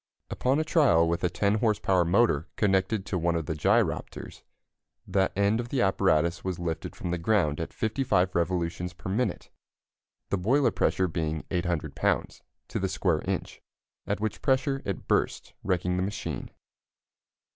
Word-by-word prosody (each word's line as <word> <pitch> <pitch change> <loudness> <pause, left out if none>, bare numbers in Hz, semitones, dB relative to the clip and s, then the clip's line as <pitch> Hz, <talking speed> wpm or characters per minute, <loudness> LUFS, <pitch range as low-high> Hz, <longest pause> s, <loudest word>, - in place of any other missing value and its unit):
Upon 130 +4 +1
a - - +2
trial 135 - +4
with 85 +1 -1
a 90 - +3
10 100 +4 +1
horse 110 -2 +2
power 95 -2 +2
motor 85 -3 +2
connected 95 0 +1
to 90 - -2
one 85 +1 +1
of 80 -2 -1
the 80 - -2
gyropters, 75 - 0 0.6
that 95 -1 +1
end 100 +3 +2
of 120 0 -4
the 130 -4 +1
apparatus 85 -4 +2
was 95 -2 -2
lifted 85 -2 -4
from 90 - -4
the 90 - -1
ground 85 -5 +1
at 80 - -4
55 110 -6 0
revolutions 85 0 -1
per 90 +2 -6
minute 105 -2 -2 0.8
the 100 - +1
boiler 130 +9 +3
pressure 95 - +1
being 80 -2 -2
800 85 -3 -1
lbs. - - 0 0.3
to - - -2
the - - -1
square - - 0
inch, - - -3 0.5
at 105 - -1
which 110 -1 -3
pressure 135 0 +1
it 100 -4 -4
burst, - - 0
wrecking 90 -1 0
the - - 0
machine. 100 +2 -4
95 Hz, 165 wpm, -27 LUFS, 85-110 Hz, 0.8 s, trial